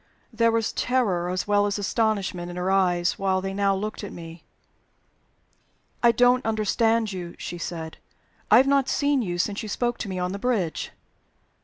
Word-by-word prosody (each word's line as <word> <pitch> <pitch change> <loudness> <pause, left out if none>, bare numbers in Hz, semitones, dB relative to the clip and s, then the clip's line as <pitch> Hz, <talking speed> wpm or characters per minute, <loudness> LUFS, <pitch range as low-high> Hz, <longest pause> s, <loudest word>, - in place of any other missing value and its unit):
There 230 0 +3
was 225 -1 0
terror 200 -9 0
as 185 0 -2
well 205 0 +3
as 205 - -1
astonishment 200 -4 -1
in 175 - -7
her 180 +1 0
eyes 180 -2 +2
while 190 -1 +1
they 195 +1 -4
now 200 0 +1
looked 210 +2 -4
at 205 - -6
me. 165 -1 -10 1.6
"I 235 - +6
don't 245 +2 +3
understand 225 0 +1
you," 175 -2 -6
she 175 - -6
said. 160 -2 -6 0.5
"I 215 - +8
have 260 - +6
not 275 -1 +2
seen 285 -2 +2
you 175 -5 -3
since 200 +3 -1
you 215 - -6
spoke 240 +3 -1
to 205 - -4
me 185 - -4
on 180 0 -1
the 200 - -5
bridge." 205 -9 -1
200 Hz, 180 wpm, -25 LUFS, 180-230 Hz, 1.6 s, I